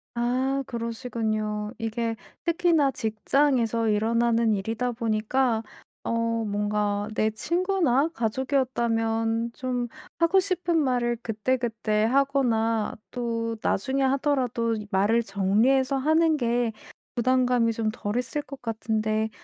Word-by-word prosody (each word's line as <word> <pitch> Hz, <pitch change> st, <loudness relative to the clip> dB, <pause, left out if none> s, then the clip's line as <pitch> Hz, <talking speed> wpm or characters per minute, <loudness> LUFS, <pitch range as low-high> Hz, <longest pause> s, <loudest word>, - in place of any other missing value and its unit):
아 260 Hz, +3 st, 0 dB
그러시군요. 220 Hz, -2 st, -3 dB
이게 225 Hz, 0 st, -2 dB, 0.3 s
특히나 330 Hz, -4 st, +3 dB
직장에서 230 Hz, 0 st, +1 dB
일어나는 230 Hz, +1 st, +2 dB
일이다 225 Hz, +5 st, -2 dB
보니까 225 Hz, +1 st, 0 dB, 0.4 s
어 -, -, -2 dB, 0.3 s
뭔가 205 Hz, 0 st, -1 dB
내 215 Hz, -, +2 dB
친구나 335 Hz, -, +1 dB
가족이었다면 230 Hz, -2 st, 0 dB
좀 250 Hz, -2 st, -2 dB, 0.3 s
하고 335 Hz, +3 st, +4 dB
싶은 360 Hz, -3 st, 0 dB
말을 245 Hz, -4 st, +1 dB
그때그때 225 Hz, -1 st, 0 dB
하거나 235 Hz, -4 st, +1 dB, 0.2 s
또 230 Hz, -2 st, -2 dB
나중에 265 Hz, +7 st, 0 dB
하더라도 260 Hz, -4 st, +1 dB, 0.2 s
말을 205 Hz, +5 st, +3 dB
정리해서 225 Hz, +8 st, +2 dB
하는 315 Hz, +3 st, +3 dB
게 240 Hz, -2 st, +1 dB, 0.4 s
부담감이 245 Hz, -1 st, +2 dB
좀 220 Hz, -1 st, -1 dB
덜 205 Hz, 0 st, -4 dB
했을 255 Hz, +4 st, -1 dB
것 275 Hz, -1 st, -11 dB
같은데 220 Hz, -1 st, -1 dB
235 Hz, 250 characters per minute, -26 LUFS, 220-265 Hz, 0.4 s, 하고